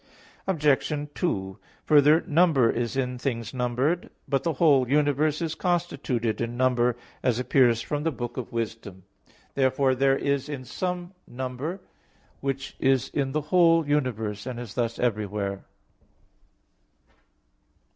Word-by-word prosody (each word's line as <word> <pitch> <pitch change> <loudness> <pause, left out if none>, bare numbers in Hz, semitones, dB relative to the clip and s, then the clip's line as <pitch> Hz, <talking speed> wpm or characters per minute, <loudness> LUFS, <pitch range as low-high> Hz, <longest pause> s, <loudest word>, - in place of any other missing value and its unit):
Obj. 150 -3 +1
2: 95 - -2 0.3
Further, 150 +2 +6
number 150 -7 +3
is 120 +2 -2
in 125 -2 -1
things 115 -3 -3
numbered. 130 +7 0 0.2
But 135 -2 +1
the 165 - -1
whole 140 -5 +4
universe 150 +2 +2
is 160 -1 -2
constituted 150 - -1
in 120 +1 -3
number, 125 -1 +2 0.2
as 125 -3 +1
appears 125 -2 +3
from 145 -1 -2
the 165 - +1
Book 120 -3 -5
of 125 - -5
Wisdom 115 -5 -5
(Wis. 100 +1 -34 0.2
11:21). - - -39
Therefore 130 0 +2
there 135 +1 +3
is 140 -2 -2
some 180 0 -3
number 130 +8 -5 0.6
which 135 0 -4
is 135 -2 +2
in 135 -2 -2
the 155 - 0
whole 165 -3 +5
universe, 115 -7 -1
and 125 -2 -5
is 120 -4 -7
thus 115 -2 -1
everywhere. 105 -4 -2
130 Hz, 135 wpm, -26 LUFS, 120-150 Hz, 0.6 s, Further